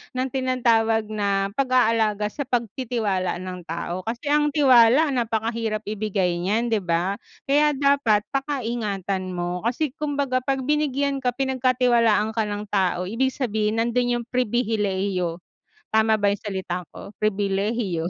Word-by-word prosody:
ng 255 Hz, +1 st, 0 dB
tinatawag 230 Hz, -4 st, +1 dB
na 200 Hz, -2 st, 0 dB
pag-aalaga 225 Hz, -5 st, +2 dB
sa 285 Hz, -, -4 dB
pagtitiwala 225 Hz, -7 st, -1 dB
ng 185 Hz, -1 st, -7 dB
tao, 170 Hz, +2 st, -4 dB
kasi 235 Hz, +5 st, -5 dB
ang 295 Hz, 0 st, +3 dB
tiwala 265 Hz, 0 st, +5 dB
napakahirap 225 Hz, -1 st, -1 dB
ibigay 200 Hz, -4 st, -1 dB
niyan 220 Hz, +5 st, +1 dB
di 220 Hz, -, +2 dB
ba? 175 Hz, +3 st, 0 dB, 0.3 s
Kaya 295 Hz, +2 st, +4 dB
dapat 275 Hz, -7 st, +3 dB
paka-ingatan 215 Hz, -9 st, -2 dB
mo 175 Hz, 0 st, -3 dB
kasi 270 Hz, +4 st, -1 dB
kumbaga 280 Hz, -4 st, -1 dB
pag 270 Hz, -1 st, 0 dB
binigyan 280 Hz, -2 st, 0 dB
ka, 250 Hz, -, +2 dB
pinagkatiwalaan 245 Hz, -5 st, +2 dB
ka 225 Hz, -, +1 dB
ng 205 Hz, 0 st, -4 dB
tao 185 Hz, -3 st, +1 dB
ibig 260 Hz, +6 st, 0 dB
sabihin 220 Hz, -4 st, -1 dB
nandun 240 Hz, +1 st, +1 dB
yung 235 Hz, -, -7 dB
pribilehiyo 205 Hz, -8 st, -1 dB, 0.6 s
tama 220 Hz, 0 st, +4 dB
ba 205 Hz, -, +2 dB
yung 200 Hz, -, -4 dB
salita 190 Hz, -3 st, -3 dB
ko 200 Hz, -, -9 dB
pribilehiyo. 200 Hz, -3 st, 0 dB
225 Hz, 135 wpm, -23 LUFS, 200-255 Hz, 0.6 s, tiwala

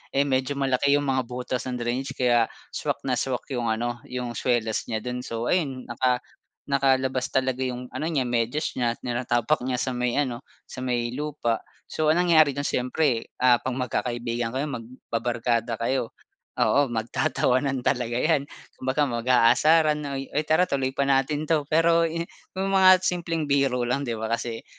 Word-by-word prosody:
eh, 140 Hz, -, +4 dB
medyo 135 Hz, 0 st, 0 dB
malaki 140 Hz, +1 st, +2 dB
yung 145 Hz, -, +1 dB
mga 130 Hz, -3 st, 0 dB
butas 125 Hz, 0 st, -4 dB
ng 125 Hz, -, -3 dB
drainage 125 Hz, +3 st, -3 dB
kaya 120 Hz, -3 st, +3 dB, 0.2 s
swak -, -, -3 dB
na 125 Hz, -3 st, 0 dB
swak 130 Hz, -2 st, -2 dB
yung 120 Hz, -3 st, -1 dB
ano 120 Hz, +2 st, -1 dB
yung 125 Hz, -1 st, -4 dB
swelas 115 Hz, -2 st, -1 dB
niya 110 Hz, -2 st, -3 dB
dun. 125 Hz, 0 st, -3 dB
So 115 Hz, -1 st, -3 dB
ayun, 140 Hz, -8 st, 0 dB
naka 125 Hz, +1 st, 0 dB, 0.4 s
nakalabas 130 Hz, -2 st, +1 dB
talaga 130 Hz, -1 st, 0 dB
yung 125 Hz, -1 st, -4 dB
ano 155 Hz, -, -3 dB
niya 150 Hz, -6 st, +1 dB
medyas 120 Hz, +5 st, -1 dB
niya, 120 Hz, -1 st, +1 dB
tinatapak 120 Hz, +3 st, 0 dB
niya 130 Hz, -, 0 dB
sa 130 Hz, -, -1 dB
may 125 Hz, -1 st, -1 dB
ano, 130 Hz, -5 st, 0 dB, 0.2 s
sa -, -, -10 dB
may 120 Hz, -2 st, -1 dB
lupa. 135 Hz, -4 st, -2 dB, 0.3 s
So 155 Hz, -, 0 dB
ang 170 Hz, +4 st, +4 dB
nangyari 155 Hz, -5 st, +5 dB
dun, 145 Hz, -, -2 dB
siyempre 125 Hz, -2 st, 0 dB, 0.2 s
ah, 125 Hz, -2 st, +6 dB
'pag 130 Hz, -1 st, -3 dB
magkakaibigan 120 Hz, -2 st, -2 dB
kayo, 135 Hz, +3 st, 0 dB
magbabarkada 115 Hz, -1 st, -2 dB
kayo, 115 Hz, 0 st, -1 dB, 0.5 s
oo, 145 Hz, 0 st, +3 dB
magtatawanan 130 Hz, +2 st, 0 dB
talaga 120 Hz, -3 st, 0 dB
yan. 145 Hz, 0 st, +1 dB, 0.3 s
Kumbaga 130 Hz, +3 st, +1 dB
mag-aasaran 135 Hz, +6 st, +4 dB
na, 140 Hz, -2 st, -4 dB
"Uy 135 Hz, -, -7 dB, 0.2 s
tara 160 Hz, +3 st, +4 dB
tuloy 135 Hz, -5 st, -1 dB
pa 140 Hz, -, +1 dB
natin 140 Hz, +2 st, +1 dB
'to. 155 Hz, -3 st, +1 dB
"Pero 165 Hz, +1 st, +4 dB
yu 165 Hz, +1 st, -2 dB, 0.3 s
yung 195 Hz, +1 st, -1 dB
mga 185 Hz, -1 st, +7 dB
simpleng 170 Hz, -3 st, -1 dB
biro 135 Hz, -3 st, +1 dB
lang, 125 Hz, +3 st, 0 dB
'di 120 Hz, -5 st, -3 dB
ba, 110 Hz, -, -4 dB
kasi 115 Hz, -1 st, -4 dB
130 Hz, 170 wpm, -25 LUFS, 120-140 Hz, 0.5 s, mga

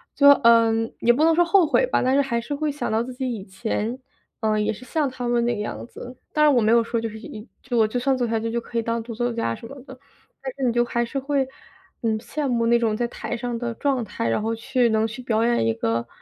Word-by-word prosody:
就， 285 Hz, -, +5 dB, 0.2 s
嗯， 225 Hz, -1 st, +4 dB
也 240 Hz, -, +4 dB
不 295 Hz, +5 st, +1 dB
能 330 Hz, -, +5 dB
说 350 Hz, -, +5 dB
后 365 Hz, -1 st, +4 dB
悔 -, -, +3 dB
吧， -, -, +1 dB
但 260 Hz, +2 st, +2 dB
是 280 Hz, -, +5 dB
还 235 Hz, -4 st, -1 dB
是 290 Hz, -, -5 dB
会 300 Hz, 0 st, -1 dB
想 290 Hz, -, -3 dB
到 225 Hz, +2 st, +1 dB
自 255 Hz, -, -7 dB
己 255 Hz, 0 st, -3 dB
以 200 Hz, -4 st, -6 dB
前， 220 Hz, +5 st, -3 dB, 0.4 s
嗯， 215 Hz, -1 st, +1 dB
也 -, -, +1 dB
是 255 Hz, +4 st, -12 dB
像 300 Hz, -3 st, 0 dB
他 250 Hz, -1 st, -5 dB
们 240 Hz, -1 st, +2 dB
那 240 Hz, -1 st, +1 dB
个 210 Hz, -, -4 dB
样 -, -, -5 dB
子。 250 Hz, 0 st, -10 dB, 0.2 s
当 300 Hz, -, +3 dB
然， 295 Hz, -, +5 dB
我 240 Hz, -, +4 dB
没 215 Hz, +1 st, +3 dB
有 235 Hz, 0 st, +5 dB
说 230 Hz, 0 st, -2 dB
就 225 Hz, -, -3 dB
是 220 Hz, +1 st, -9 dB, 0.4 s
就 250 Hz, -3 st, -4 dB
我 220 Hz, -1 st, +4 dB
就 245 Hz, +3 st, -2 dB
算 265 Hz, +1 st, +1 dB
走 245 Hz, -2 st, 0 dB
下 225 Hz, 0 st, 0 dB
去 230 Hz, +1 st, -2 dB
可 235 Hz, 0 st, -7 dB
以 -, -, +2 dB
当 230 Hz, 0 st, -1 dB
独 230 Hz, -1 st, -7 dB
奏 240 Hz, 0 st, -1 dB
家 115 Hz, -, -1 dB
什 230 Hz, -, -10 dB
么 275 Hz, -1 st, -11 dB
的。 -, -, -12 dB, 0.4 s
但 265 Hz, -1 st, -5 dB
是 275 Hz, -, -5 dB
你 235 Hz, -, +1 dB
就 240 Hz, 0 st, +2 dB
还 235 Hz, 0 st, -1 dB
是 275 Hz, +4 st, -3 dB
会， 275 Hz, -1 st, 0 dB, 0.5 s
嗯， 220 Hz, -2 st, 0 dB
羡 290 Hz, +4 st, -3 dB
慕 235 Hz, -2 st, +1 dB
那 235 Hz, 0 st, +4 dB
种 220 Hz, -2 st, +1 dB
在 240 Hz, -, 0 dB
台 240 Hz, -, -5 dB
上 240 Hz, -1 st, -3 dB
的 235 Hz, -1 st, -3 dB
状 265 Hz, -3 st, 0 dB
态， 115 Hz, -, -3 dB
然 115 Hz, -, 0 dB
后 225 Hz, +1 st, -1 dB
去 240 Hz, +1 st, +1 dB
能 220 Hz, 0 st, +2 dB
去 235 Hz, +4 st, -8 dB
表 225 Hz, -2 st, +1 dB
演 235 Hz, -, +2 dB
一 115 Hz, -, +2 dB
个， 115 Hz, +1 st, -1 dB
235 Hz, 300 characters per minute, -23 LUFS, 225-260 Hz, 0.5 s, 就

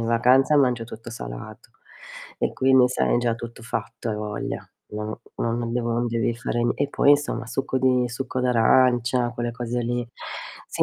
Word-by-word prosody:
in -, -, -1 dB
vacanza 130 Hz, +5 st, +4 dB
mangio 125 Hz, -4 st, +3 dB
tutto 115 Hz, 0 st, -9 dB
salato. -, -, -8 dB, 0.7 s
E, -, -, 0 dB
quindi, 130 Hz, -1 st, +5 dB
sai, -, -, +1 dB
è -, -, +3 dB
già 120 Hz, -1 st, +1 dB
tutto 120 Hz, 0 st, -9 dB
fatto, 115 Hz, 0 st, -4 dB
hai 105 Hz, -, -2 dB
voglia. 105 Hz, -1 st, -5 dB, 0.2 s
No. 105 Hz, +1 st, -5 dB, 0.2 s
No, 115 Hz, -, -1 dB
non 115 Hz, 0 st, -2 dB
devono 120 Hz, -1 st, 0 dB
non 120 Hz, -, 0 dB
devi 115 Hz, 0 st, 0 dB
fare 120 Hz, 0 st, -2 dB
n 120 Hz, -, +2 dB
e 140 Hz, 0 st, -1 dB
poi, 145 Hz, -, +3 dB
insomma, 145 Hz, -5 st, +2 dB
succo 130 Hz, +1 st, -1 dB
di 125 Hz, -1 st, +3 dB
succo 125 Hz, +1 st, -3 dB
d'arancia, 125 Hz, 0 st, +3 dB
quelle 120 Hz, -1 st, -3 dB
cose 120 Hz, 0 st, -3 dB
lì. 120 Hz, 0 st, -2 dB, 0.6 s
Sì, -, -, 0 dB
120 Hz, 185 wpm, -24 LUFS, 115-125 Hz, 0.7 s, quindi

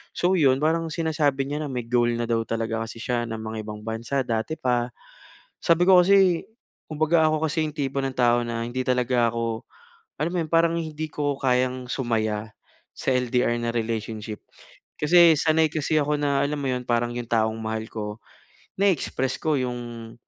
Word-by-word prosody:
So 180 Hz, +2 st, +2 dB
'yon 135 Hz, -4 st, +4 dB
parang 165 Hz, +1 st, +1 dB
sinasabi 150 Hz, -4 st, 0 dB
niya 150 Hz, +2 st, -3 dB
na -, -, -7 dB
may 125 Hz, -2 st, -3 dB
goal 120 Hz, 0 st, +2 dB
na 120 Hz, -, -1 dB
daw 115 Hz, -1 st, 0 dB
talaga 115 Hz, 0 st, -2 dB
kasi 115 Hz, -, -9 dB
siya 120 Hz, -1 st, 0 dB
na 115 Hz, -, -3 dB
mangibang 110 Hz, -1 st, -6 dB
bansa 115 Hz, +5 st, -2 dB
dati 115 Hz, +7 st, -2 dB
pa. 120 Hz, -1 st, 0 dB, 0.7 s
Sabi 170 Hz, +1 st, +4 dB
ko 185 Hz, -1 st, +7 dB
kasi 190 Hz, -2 st, +4 dB, 0.4 s
kumbaga 155 Hz, +1 st, +2 dB
ako 155 Hz, 0 st, 0 dB
kasi 160 Hz, +2 st, 0 dB
'yong 150 Hz, -, -7 dB
tipo 140 Hz, -1 st, -2 dB
ng 135 Hz, -1 st, -3 dB
tao 120 Hz, -1 st, +4 dB
na 115 Hz, 0 st, -3 dB
hindi 120 Hz, +2 st, -4 dB
talaga 125 Hz, -1 st, +2 dB
ako 115 Hz, -1 st, -3 dB, 0.5 s
alam 160 Hz, +3 st, -2 dB
mo 180 Hz, -, -1 dB
'yon 160 Hz, -, -3 dB
parang 165 Hz, 0 st, +4 dB
hindi 155 Hz, -1 st, -5 dB
ko 145 Hz, -1 st, -1 dB
kayang 125 Hz, -1 st, 0 dB
sumaya 110 Hz, -4 st, -1 dB, 0.5 s
sa 130 Hz, -, 0 dB
LDR 125 Hz, -1 st, +1 dB
na 120 Hz, -, -2 dB
relationship. 110 Hz, -2 st, -3 dB, 0.6 s
Kasi 165 Hz, 0 st, +6 dB
sanay 160 Hz, 0 st, +3 dB
kasi 155 Hz, 0 st, -1 dB
ako 150 Hz, 0 st, 0 dB
na, 140 Hz, -1 st, +1 dB
alam 145 Hz, +1 st, -1 dB
mo 140 Hz, -, -2 dB
'yon, 125 Hz, 0 st, -2 dB
parang 120 Hz, 0 st, 0 dB
'yong 120 Hz, -1 st, -5 dB
taong 110 Hz, -1 st, +2 dB
mahal 110 Hz, 0 st, -3 dB
ko 105 Hz, 0 st, -5 dB, 0.6 s
na-express 165 Hz, -9 st, +1 dB
ko 155 Hz, -2 st, +1 dB
'yong, 120 Hz, -2 st, -5 dB
125 Hz, 180 wpm, -24 LUFS, 115-155 Hz, 0.7 s, ko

